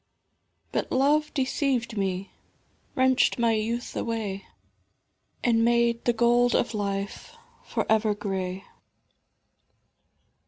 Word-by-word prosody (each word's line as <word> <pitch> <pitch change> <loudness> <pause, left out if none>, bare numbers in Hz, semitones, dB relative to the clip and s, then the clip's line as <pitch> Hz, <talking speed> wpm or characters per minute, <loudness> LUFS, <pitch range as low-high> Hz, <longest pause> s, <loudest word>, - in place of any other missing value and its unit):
But - - -2
Love 295 +3 +2
deceived 260 -4 0
me, 195 -1 -2 0.6
wrenched 260 -2 +3
my 235 -1 +2
youth 225 +2 -2
away 215 -4 -3 1.0
And 230 -2 +3
made 235 0 +2
the 240 - +4
gold 240 +1 +3
of 240 - +1
life 200 -1 -4 0.3
for - - -2
ever 215 -1 +2
grey. 190 -2 -4
230 Hz, 95 wpm, -26 LUFS, 205-245 Hz, 1.0 s, the